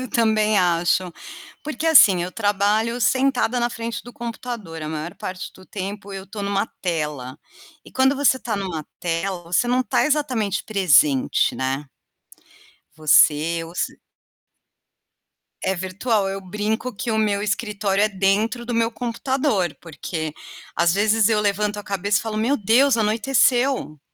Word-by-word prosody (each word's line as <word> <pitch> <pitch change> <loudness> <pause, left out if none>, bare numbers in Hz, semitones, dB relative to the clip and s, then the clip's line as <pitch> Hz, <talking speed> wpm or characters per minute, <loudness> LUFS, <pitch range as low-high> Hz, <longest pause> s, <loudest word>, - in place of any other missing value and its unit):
Eu 255 - -5
também 215 -2 +2
acho. 175 0 +1 0.5
Porque 310 +1 -4
assim, 200 - +7
eu 180 - -4
trabalho 210 +3 0
sentada 260 -1 +2
na 240 0 0
frente 230 -1 -5
do 245 - -12
computador, 230 -8 -6
a 155 - -4
maior 160 +2 -5
parte 185 -3 -6
do 185 - -15
tempo 200 +1 -6
eu 195 0 -7
estou 205 0 -7
em - - -2
uma 200 0 0 0.2
tela 150 -7 -3 0.5
e - - -14
quando 265 +1 +3
você 280 -2 +3
está 230 -5 -4
em 200 - -3
uma 165 -5 -4 0.2
tela, 175 +2 -2
você 175 +8 +1
não 250 +1 +2
está 220 - +1
exatamente 255 -10 0
presente, 150 -10 +3
né. 135 +2 -2 1.1
Você 155 +1 +3
ou 165 +2 -12
se - - -3 1.6
É 190 +1 0
virtual, 195 +3 -1
eu 195 0 -3
brinco 210 +6 -3
que 235 - -4
o 220 - 0
meu 205 -2 +1
escritório 205 -1 -1
é 215 - +3
dentro 205 +5 0
do 240 - -4
meu 230 0 +1
computador, 240 - -1
porque 160 -1 -5 0.4
às 170 +1 +2
vezes 215 +1 +3
eu 220 -2 +2
levanto 210 0 0
a - - -5
cabeça 200 +1 0
e - - -5
falo: 215 -1 -4
"Meu 255 +6 +1
Deus, 240 +6 +3
anoiteceu". 240 - +1
205 Hz, 155 wpm, -22 LUFS, 180-230 Hz, 1.6 s, assim